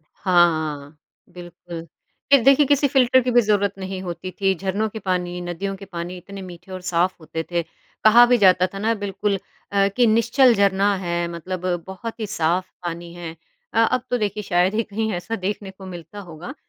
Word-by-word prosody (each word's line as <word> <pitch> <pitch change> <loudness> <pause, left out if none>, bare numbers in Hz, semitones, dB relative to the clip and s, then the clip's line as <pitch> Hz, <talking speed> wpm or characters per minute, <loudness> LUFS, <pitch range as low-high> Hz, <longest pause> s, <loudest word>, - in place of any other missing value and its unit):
हाँ, 175 -2 +4
हाँ, 150 -2 -4 0.3
बिल्कुल। 175 -1 -9 0.5
ख़ैर 275 -4 +7
देखिए 275 +1 +6
किसी 285 0 +3
फ़िल्टर 260 -1 +4
की 250 - -1
भी 240 0 +5
ज़रूरत 205 -2 +1
नहीं 190 0 -5
होती 180 +1 -6
थी, 195 -1 +3
झरनों 195 +4 -2
के 220 - -7
पानी 180 -2 -2
नदियों 175 +3 -4
के 195 - -10
पानी 175 0 -6
इतने 195 +2 -10
मीठे 185 +1 -11
और 185 - -5
साफ़ 180 +1 +1
होते 160 +1 -5
थे। 170 -1 0 0.4
कहा 235 +3 +8
भी 245 0 +4
जाता 185 -2 +5
था - - -5
ना 225 +3 +1
बिल्कुल 200 0 -2 0.4
अ, 200 0 +3
कि 245 -1 +5
निश्चल 230 +3 +4
झरना 200 0 +3
है 175 -2 -2
मतलब 180 +2 -5 0.2
बहुत 225 +5 -7
ही 215 - -2
साफ़ 180 -1 0 0.2
पानी 170 0 -5
है 165 -2 -8 0.4
अ, - - +1
अब 245 +2 +2
तो 245 - +1
देखिए 210 0 -2
शायद 180 +2 +1
ही 225 - +2
कहीं 220 +1 -3
ऐसा 180 +6 -4
देखने 195 +1 -4
को 190 0 -12
मिलता 180 +3 -9
होगा। 175 - -9
190 Hz, 195 wpm, -22 LUFS, 175-215 Hz, 0.5 s, कहा